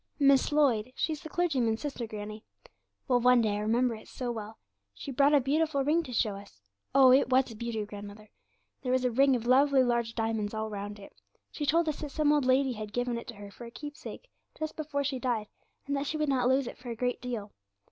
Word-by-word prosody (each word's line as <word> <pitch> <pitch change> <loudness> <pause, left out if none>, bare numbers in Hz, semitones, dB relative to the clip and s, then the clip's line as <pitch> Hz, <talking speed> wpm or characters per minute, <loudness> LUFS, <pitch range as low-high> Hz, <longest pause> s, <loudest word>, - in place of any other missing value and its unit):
'Miss 275 -1 +4
Lloyd; 255 -6 +2
she's 310 -2 -2
the 315 - -8
clergyman's 265 -11 0
sister, 275 -5 -4
granny. 215 0 -7 0.6
Well, 250 -3 +3
one 250 0 +5
day 220 -2 +2
(I - - -2
remember 230 +3 +1
it 220 - -10
so 250 -2 -4
well) 220 -1 -7 0.4
she 280 - -7
brought 280 +3 +4
a - - +6
beautiful 280 +1 +1
ring 315 +4 +3
to 305 - -9
show 220 -3 +1
us. 200 - -13 0.4
Oh! 265 -2 +8
it 260 0 +5
was 260 -1 +3
a - - -9
beauty, 225 -1 -3
grandmother. 205 +1 -10 0.5
There 255 - -2
was 255 0 +2
a 250 - +2
ring 270 +2 +4
of 235 -2 -3
lovely 265 +2 +5
large 235 -2 0
diamonds 225 -2 -1
all 220 0 -3
round 205 0 -5
it. 200 - -13 0.4
She 295 - -4
told 330 +3 +3
us 305 - -2
that 300 - -5
some 300 +1 +2
old 295 -3 +2
lady 260 0 +3
had 215 -2 -7
given 245 0 -1
it 235 - -6
to 235 - -8
her 205 0 -10
for 240 - -11
a - - -8
keepsake, 295 - -9 0.3
just 310 0 -4
before 295 -2 -2
she 270 -2 -2
died, 230 -4 -1 0.4
and 280 - -1
that 275 0 -2
she 310 - -2
would 305 -1 0
not 255 -3 +2
lose 265 +1 +3
it - - -8
for 245 0 -9
a 230 - -4
great 250 +2 -2
deal. 230 -5 -5
250 Hz, 235 wpm, -29 LUFS, 220-280 Hz, 0.6 s, Oh